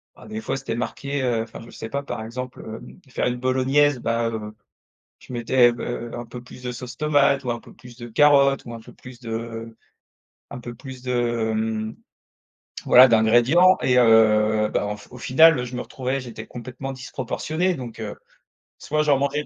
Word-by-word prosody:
Bah, -, -, -15 dB
des 220 Hz, +1 st, -5 dB
fois, 135 Hz, -, -3 dB
c'était 135 Hz, -, -4 dB
marqué, 140 Hz, +3 st, -3 dB
heu, 120 Hz, -3 st, 0 dB
enfin, 115 Hz, -, -11 dB
je 115 Hz, -, -13 dB
sais 110 Hz, -, -8 dB
pas, 140 Hz, +4 st, -2 dB
par 140 Hz, -5 st, -6 dB
exemple, 125 Hz, +3 st, -7 dB
hem, 110 Hz, +9 st, -10 dB
faire 125 Hz, -, -1 dB
une 125 Hz, -, -1 dB
bolognaise, 130 Hz, +2 st, +2 dB
bah, 115 Hz, 0 st, 0 dB
heu, 110 Hz, -2 st, -6 dB, 0.6 s
je -, -, -12 dB
mettais 120 Hz, +1 st, +4 dB
b 120 Hz, -, -9 dB
heu, 120 Hz, -1 st, -5 dB
un 120 Hz, -, -6 dB
peu 120 Hz, +1 st, -9 dB
plus 125 Hz, -, -13 dB
de 125 Hz, -1 st, -4 dB
sauce 125 Hz, 0 st, -8 dB
tomate 145 Hz, -2 st, +2 dB
ou 125 Hz, -, -4 dB
un 120 Hz, -, -3 dB
peu -, -, -16 dB
plus 120 Hz, -1 st, -15 dB
de 120 Hz, -1 st, -8 dB
carottes 140 Hz, +2 st, +4 dB
ou 120 Hz, -, -8 dB
un -, -, -8 dB
peu -, -, -15 dB
plus 125 Hz, -1 st, -13 dB
de 115 Hz, -1 st, -6 dB, 0.8 s
un -, -, -7 dB
peu 120 Hz, 0 st, -8 dB
plus 130 Hz, +1 st, -10 dB
de, 125 Hz, 0 st, -3 dB, 0.4 s
hem 110 Hz, 0 st, -2 dB, 0.9 s
voilà, 130 Hz, +1 st, +8 dB
d'ingrédients. 120 Hz, +11 st, +5 dB
Et 125 Hz, -1 st, +2 dB
heu, 110 Hz, -2 st, +4 dB
bah -, -, 0 dB
en 105 Hz, 0 st, -4 dB
f 105 Hz, -, -15 dB
au 125 Hz, -, -10 dB
final, 160 Hz, +6 st, +5 dB
heu, 125 Hz, -, -2 dB
je 125 Hz, +1 st, -7 dB
me 125 Hz, -, -3 dB
retrouvais, 130 Hz, +1 st, -3 dB
j'étais 125 Hz, -3 st, -8 dB
complètement 130 Hz, +3 st, -7 dB
disproportionné, 140 Hz, +7 st, -2 dB
donc, 120 Hz, -6 st, -8 dB
heu, 105 Hz, -2 st, -5 dB, 0.6 s
soit 150 Hz, +1 st, -1 dB
j'en 145 Hz, -2 st, +3 dB
mangeais 140 Hz, +2 st, -1 dB
125 Hz, 200 wpm, -23 LUFS, 115-135 Hz, 0.9 s, voilà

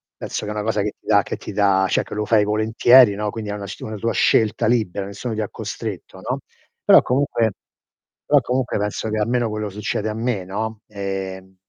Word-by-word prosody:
penso -, -, -5 dB
che 105 Hz, -, -4 dB
è -, -, -3 dB
una 105 Hz, -, -3 dB
cosa 110 Hz, -1 st, 0 dB
che 105 Hz, +1 st, -1 dB
ti -, -, -36 dB
dà 100 Hz, -1 st, +4 dB
che -, -, -4 dB
ti -, -, -8 dB
dà 100 Hz, -2 st, +3 dB
cioè -, -, +2 dB
che -, -, -10 dB
lo 105 Hz, -, -1 dB
fai 105 Hz, -1 st, +3 dB
volentieri, 110 Hz, +2 st, +5 dB
no, 105 Hz, +1 st, -2 dB
quindi 110 Hz, -1 st, -6 dB
è 105 Hz, -, -2 dB
una 100 Hz, -1 st, -6 dB
s 100 Hz, -, -8 dB
una 110 Hz, -1 st, -5 dB
tua 115 Hz, +3 st, -1 dB
scelta 110 Hz, +1 st, +2 dB
libera, 110 Hz, -4 st, 0 dB
nessuno 100 Hz, +4 st, -5 dB
ti 110 Hz, -, -2 dB
ha 105 Hz, -, -3 dB
costretto, 110 Hz, -2 st, -6 dB
no, -, -, -3 dB, 0.5 s
però -, -, +8 dB
comunque 125 Hz, -4 st, +1 dB, 0.7 s
però 145 Hz, -, +5 dB
comunque 125 Hz, +1 st, -1 dB
penso 105 Hz, +1 st, -2 dB
che 110 Hz, -, -1 dB
almeno 120 Hz, +2 st, +1 dB
quello 105 Hz, 0 st, -3 dB
succede 105 Hz, +1 st, -3 dB
a -, -, -2 dB
me, 110 Hz, -4 st, -2 dB
no, 110 Hz, +3 st, -4 dB
ehm. 95 Hz, -2 st, -5 dB
105 Hz, 220 wpm, -21 LUFS, 100-115 Hz, 0.7 s, però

